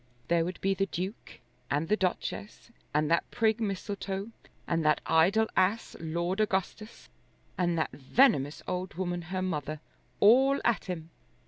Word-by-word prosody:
There 170 -1 +3
would 180 +2 -5
be 195 0 +2
the 195 0 0
Duke 185 +4 -6 0.3
and 150 +3 0
the 210 - +3
Duchess 205 +3 -3 0.2
and 150 +1 +1
that 170 - +2
prig 220 0 +1
Mistletoe, 200 0 -3 0.3
and 165 -1 0
that 150 -1 +3
idle 195 +8 +4
ass 205 +5 +1
Lord 170 +4 -2
Augustus, 215 +1 -2 0.5
and 175 -2 0
that 155 - 0
venomous 145 - +2
old 180 -2 -3
woman 175 -1 -2
her 185 +3 -3
mother, 155 -4 -3 0.4
all 265 +6 +6
at 235 - +2
him. 165 -3 -6
185 Hz, 145 wpm, -29 LUFS, 165-210 Hz, 0.5 s, all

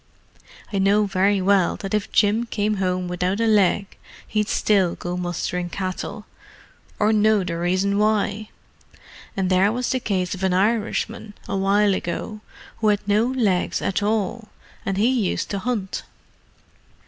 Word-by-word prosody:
I 200 - +1
know 200 +2 +3
very 195 0 +1
well 195 -2 +3
that 195 0 -6
if 210 -1 -1
Jim 220 +3 +2
came 210 -1 -1
home 185 -1 -1
without 180 +3 -1
a 230 - +2
leg 205 -2 +2 0.3
he'd 210 -1 0
still 195 -5 +2
go 175 0 -4
mustering 175 0 -3
cattle, 185 0 -5 0.7
or 215 +1 +2
know 215 -1 +3
the 170 -2 -3
reason 185 +3 +1
why! 215 0 0 0.9
And 190 -1 0
there 190 +3 +4
was 245 +2 -2
the 260 - +1
case 185 -6 -1
of 190 - -7
an 190 -1 +1
Irishman, 215 +1 -1
a 195 - -2
while 200 +1 +3
ago, 210 +4 -4 0.4
who 220 - 0
had 205 -1 +1
no 210 +3 +3
legs 220 -9 0
at 195 - -1
all—and 215 -1 -3
he 230 -1 +2
used - - -3
to 200 - -1
hunt." 210 -4 -2
200 Hz, 150 wpm, -22 LUFS, 185-215 Hz, 0.9 s, there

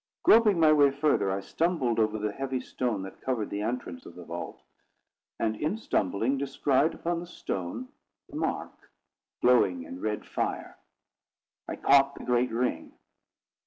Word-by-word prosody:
Groping 215 -5 +6
my 155 -1 +6
way 145 -2 +6
further, 140 -8 +1
I 95 +1 -1
stumbled 140 - 0
over 110 -1 +1
the 105 0 -2
heavy 135 +2 -3
stone 120 -5 -3
that 95 - -10
covered 120 -5 -2
the 100 - -2
entrance 105 -7 -4
of 85 - -12
the 90 - -9
vault: 85 +1 -6 0.8
and, 110 -1 0
in 155 - -1
stumbling, 115 - 0
descried 140 +2 +1
upon 170 0 -2
the 175 - -8
stone 110 - -5 0.4
the - - -12
mark, - - -4 0.5
glowing 95 -8 +4
in 90 +2 -9
red 105 -1 -2
fire. - - -3 0.9
I - - -4
caught 140 0 +4
the - - -9
great 125 0 +2
ring. 120 +2 -2
125 Hz, 155 wpm, -28 LUFS, 105-140 Hz, 0.9 s, Groping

